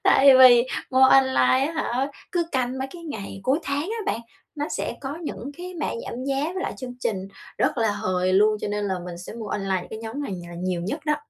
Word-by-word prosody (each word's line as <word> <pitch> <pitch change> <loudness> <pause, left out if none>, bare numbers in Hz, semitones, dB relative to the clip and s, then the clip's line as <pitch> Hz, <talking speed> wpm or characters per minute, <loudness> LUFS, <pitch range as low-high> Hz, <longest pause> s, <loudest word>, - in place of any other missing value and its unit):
Tại 275 +1 +6
vì 245 -1 +8 0.2
mua 260 0 +4
online 260 0 +5
á 320 - -4
hả, 265 -1 0 0.2
cứ 340 -2 +1
canh 255 0 -1
mấy 265 - -3
cái 345 -1 -10
ngày 200 -9 -6
cuối 265 +7 +2
tháng 280 +1 -1
á 425 +3 -2
bạn, - - -4 0.3
nó 295 0 -3
sẽ - - -3
có 275 +2 -5
những 280 -4 -5
cái 360 0 -7
mã - - 0 0.2
giảm 250 +2 -5
giá 275 +1 0
với 375 - -3
lại - - -3
chương 255 -1 -6
trình 195 -5 -2 0.3
rất - - +1
là 220 -2 +2
hời 185 -2 0
luôn. 210 +3 +4
Cho - - -3
nên 205 0 -2
là 190 - 0
mình 175 -1 -7
sẽ 180 - -8
mua 225 -2 -6
online 195 -2 -1
những - - -11
cái 220 - -6
nhóm 225 +6 -5
này 245 - -4
nhà 175 -2 -7
nhiều 180 -1 -1
nhất 240 - -3
đó. 300 - +2
255 Hz, 245 wpm, -24 LUFS, 200-280 Hz, 0.3 s, vì